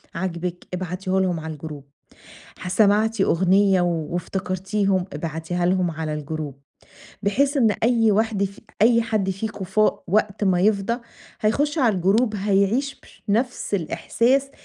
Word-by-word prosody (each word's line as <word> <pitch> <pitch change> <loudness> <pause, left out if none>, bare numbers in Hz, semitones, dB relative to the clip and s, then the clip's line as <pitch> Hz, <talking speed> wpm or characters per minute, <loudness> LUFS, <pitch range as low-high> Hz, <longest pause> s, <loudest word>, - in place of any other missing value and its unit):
عاجبِك 175 0 -4
ابعتيه 185 +1 -2
لهُم 180 -3 0
على 160 0 -6
الجروب، 150 -1 -8 0.8
ح 185 - -6
سمعتِ 210 +2 +3
أغنية 190 +1 +3
وافتكرتيهم 185 +3 -1
ابعتيها 165 +3 -3
لهُم 180 -1 +1
على 155 -1 -4
الجروب، 150 -1 -5 0.7
بحيث 275 +8 +1
إن 230 -5 +4
أي 230 -2 +4
واحدة 210 -1 +1
ف 195 +1 -9 0.2
أي 235 +1 +5
حد 215 -4 -1
فيكم 195 +1 -4
فا 210 +3 +2
وقت 205 +2 +1
ما 185 -2 +2
يفضى 200 +2 +2 0.5
هيخُشّ 285 +9 +1
علي 240 -8 +3
الجروب 210 +5 +2
هيعيش 205 +7 +1
بش - - -20
نفس 235 +2 -1
الإحساس 245 - +1
195 Hz, 130 wpm, -23 LUFS, 175-220 Hz, 0.8 s, أي